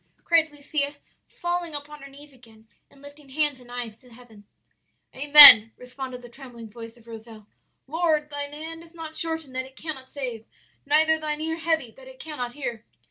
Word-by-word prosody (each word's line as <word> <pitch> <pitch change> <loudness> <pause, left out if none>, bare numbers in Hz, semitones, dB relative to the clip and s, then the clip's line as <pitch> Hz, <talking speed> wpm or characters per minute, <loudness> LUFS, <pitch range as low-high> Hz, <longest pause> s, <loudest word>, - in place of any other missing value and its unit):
cried 325 -2 +1
Lucia, 290 0 -4 0.3
falling 345 -2 -5
upon 295 0 -9
her 275 - -12
knees 285 +1 -16
again, 225 -3 -21 0.2
and 280 0 -22
lifting 285 0 -15
hands 295 -1 -1
and 245 -1 -17
eyes 240 -3 -7
to 250 0 -18
heaven. 225 -3 -18 0.7
"'Amen!' 265 -5 +9
responded 250 0 -9
the - - -11
trembling 240 -2 -13
voice 230 +1 -12
of 230 - -22
Rozel. 225 -2 -13 0.4
'Lord, 310 0 -1
Thine 285 0 -5
hand 320 +2 -9
is 335 0 -18
not 320 -1 -9
shortened 320 -5 -3
that 260 0 -4
it 265 - -21
cannot 270 -5 -8
save, 245 -6 -7 0.4
neither 315 +2 +2
Thine 305 -1 -4
ear 320 +1 -4
heavy 320 -7 -2
that 260 +3 -17
it 260 0 -14
cannot 250 -6 -7
hear!' 240 -6 -6
280 Hz, 180 wpm, -24 LUFS, 245-310 Hz, 0.7 s, Amen